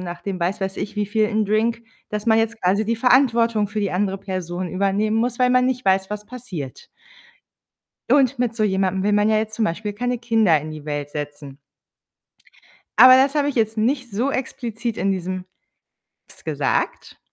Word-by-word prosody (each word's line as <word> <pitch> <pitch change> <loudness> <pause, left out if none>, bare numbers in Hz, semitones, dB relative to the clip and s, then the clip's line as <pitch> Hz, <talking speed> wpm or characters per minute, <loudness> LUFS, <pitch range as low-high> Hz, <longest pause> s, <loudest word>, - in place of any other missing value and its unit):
nach 175 -1 -6
dem 195 -2 -4
was 185 +4 -1
weiß 190 0 -3
ich 210 - -5
wievielten 215 +1 0
Drink, 225 +2 0 0.3
dass 210 +1 -4
man 220 0 +4
jetzt 225 0 -1
quasi 195 +4 +1
die 230 - 0
Verantwortung 230 -4 +3
für 215 0 -3
die 200 - -1
andere 195 +1 -1
Person 185 -2 -4
übernehmen 200 +4 0
muss, 240 +1 0
weil 250 0 +4
man 250 0 +4
nicht 255 -1 -1
weiß, 190 0 +2
was 210 0 -5
passiert. 205 - -8 1.2
Und 270 -2 +3
mit 235 -2 0
so 215 - 0
jemandem 190 -1 0
will 210 - +1
man 205 +1 +3
ja 215 - +3
jetzt 220 0 -3
zum 225 - +1
Beispiel 210 +4 -3
keine 245 +3 -2
Kinder 225 -9 +3
in 155 0 -7
die 155 -1 -9
Welt 145 -1 -4
setzen. 145 -1 -7 1.4
Aber 255 0 +10
das 270 +2 +3
habe 290 -1 +2
ich 285 - -2
jetzt 220 -1 0
nicht 250 +2 0
so 245 +8 0
explizit 235 -3 -4
in 195 0 +1
diesem 185 0 -4 0.8
Text - - -18
gesagt. - - -2
215 Hz, 185 wpm, -21 LUFS, 190-235 Hz, 1.4 s, Aber